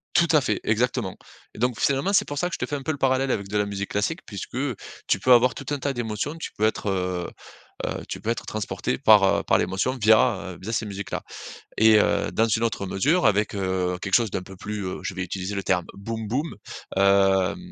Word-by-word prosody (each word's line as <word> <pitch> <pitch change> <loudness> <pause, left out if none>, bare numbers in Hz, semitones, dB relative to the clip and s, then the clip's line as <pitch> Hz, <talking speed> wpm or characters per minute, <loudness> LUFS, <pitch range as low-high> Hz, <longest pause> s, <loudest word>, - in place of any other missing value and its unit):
Tout 170 - +5
à 150 - +5
fait, 110 -5 -1
exactement 115 -2 0 0.4
et - - -10
donc, 120 -2 0
finalement, 140 +9 +1
c'est - - +3
pour 145 - -5
ça 180 - +1
que - - -11
je - - -2
te - - -1
fais 145 - -4
un 140 - -4
peu 155 - -1
le 150 - -4
parallèle 135 0 +1
avec 100 -1 -2
de 105 +2 -2
la 105 - +1
musique 100 0 -4
classique 105 +11 -1
puisque 100 +2 -7 0.5
tu - - +2
peux 130 - +2
avoir 125 +1 +5
tout - - -9
un 145 - 0
tas 140 0 -1
d'émotions. 120 +4 -3
Tu 165 - -6
peux 105 - -2
être, 110 -1 -1
heu 90 -2 -2 0.6
heu, - - -4
tu - - -4
peux 110 - -3
être 115 - -4
transporté 110 -1 -3
par, 110 -6 +6
heu, 95 - +3
par - - +3
l'émotion 95 +8 0
via, 105 -3 +3
heu, - - -12
via, 110 - -5
ces 115 - -1
musiques-là 100 0 -5 0.6
et 110 0 +6
heu, - - +1
dans 115 - +2
une 115 +1 0
autre 100 -3 -2
mesure 130 - +2
avec, 105 0 +2
heu, 95 -2 -1
quelque 95 -1 -2
chose 115 -2 +3
d'un 90 - -3
peu 95 0 -12
plus, 105 +1 -5
heu, 90 - -5
je - - -3
vais 90 - -3
utiliser 95 +3 -4
le 100 - -2
terme 90 -2 +1
boum 110 +2 -5
boum, 145 +8 -2 0.4
hem, 95 - +3
105 Hz, 240 wpm, -24 LUFS, 95-125 Hz, 0.6 s, par